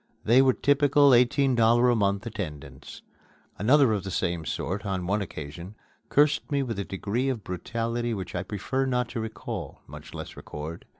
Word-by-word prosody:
They 120 +4 +6
were 130 -1 +4
typical 145 -1 +4
eighteen 125 +2 +4
dollar 120 +1 +4
a - - +2
month 100 0 0
attendants. 75 - -7 0.6
Another 130 +3 +4
of 100 - -2
the 95 - -5
same 85 -3 -2
sort, 95 +6 -3
on 95 -3 -3
one 100 +3 0
occasion, 85 +2 -7 0.3
cursed 150 +1 +2
me 140 -1 +1
with 115 -6 -4
a - - -1
degree 105 +8 -2
of 120 -6 -3
brutality 115 +6 -3
which 95 -5 -5
I - - -2
prefer 130 +6 -2
not 125 -1 0
to 120 - -4
recall, 110 0 -6
much - - -11
less - - -7
record. 75 +3 -8
110 Hz, 175 wpm, -26 LUFS, 95-125 Hz, 0.6 s, They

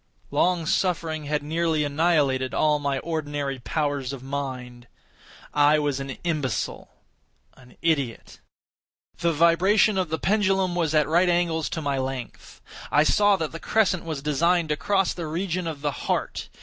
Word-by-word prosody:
Long 175 -2 +1
suffering 160 -3 -1
had 150 0 -1
nearly 160 0 0
annihilated 145 -4 +1
all 150 -1 +2
my 140 -1 -1
ordinary 145 -3 -3
powers 145 -1 -2
of 135 -2 -8
mind. 130 -3 -5 0.7
I 145 +1 +5
was 145 -2 -1
an 135 -2 -6
imbecile—an 130 - -6
idiot. 140 -8 -1 0.8
The 170 0 +2
vibration 185 +6 +3
of 180 -3 -1
the 160 - -1
pendulum 195 -1 +1
was 165 -3 0
at 150 -2 +3
right 175 +3 +3
angles 170 -2 +1
to 160 - -4
my 140 -2 -1
length. 130 -2 -6 0.3
I 150 - +5
saw 205 +5 +4
that 160 -4 -3
the 165 - -7
crescent 205 -4 +1
was 155 -4 -5
designed 165 +3 +1
to 150 - +1
cross 195 +4 +1
the 170 -3 -5
region 175 +2 -2
of 155 -3 -5
the 145 0 0
heart. - - -3
155 Hz, 150 wpm, -25 LUFS, 140-170 Hz, 0.8 s, I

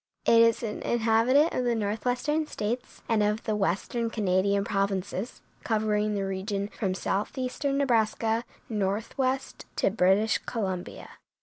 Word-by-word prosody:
It 230 0 +6
is 230 +1 +4
an 210 -2 -4
inhabitant 235 +6 +3
of 255 - 0
the 240 -1 +1
northwestern 245 +9 -1
states 240 +2 -4
and 225 -3 +2
of 210 +1 +1
the 215 -2 -1
western 210 +4 -1
Canadian 200 -2 +1
provinces, 195 +1 -2 0.2
covering 215 -1 +1
the 195 -1 -1
region 195 +1 -3
from 190 -4 -2
southeastern 255 +8 -2
Nebraska 225 -3 +1 0.2
northwest 230 +6 -2
to - - +2
British 200 +2 +3
Columbia. 190 -6 -4
220 Hz, 125 wpm, -27 LUFS, 200-240 Hz, 0.2 s, It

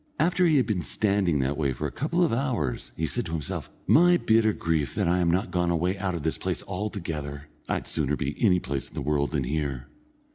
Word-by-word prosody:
After 180 +1 +3
he 155 -3 +4
had 130 - +3
been 105 -6 -1
standing 100 -5 +1
that 70 +2 -1
way 70 -4 0
for - - -4
a - - -2
couple 170 +5 0
of 165 - +2
hours, 115 - -1
he 80 - 0
said 120 +7 -2
to 80 - -5
himself: 75 -4 -4 0.2
"My 175 +2 +6
bitter 110 -6 +3
grief 80 -8 -1
that - - +1
I 90 +2 +2
am 85 -1 +2
not 90 +4 0
gone 90 -1 +1
away 85 +3 +1
out 95 -2 -2
of 80 - -5
this 80 - -1
place - - -3
altogether. 80 -8 -4 0.2
I'd - - -1
sooner 75 -2 0
be 70 0 -3
any 95 -5 +5
place 70 -3 -4
in - - -16
the 80 - -3
world 70 0 +1
than 75 -4 -1
here. 70 -1 -3
85 Hz, 230 wpm, -26 LUFS, 75-105 Hz, 0.2 s, My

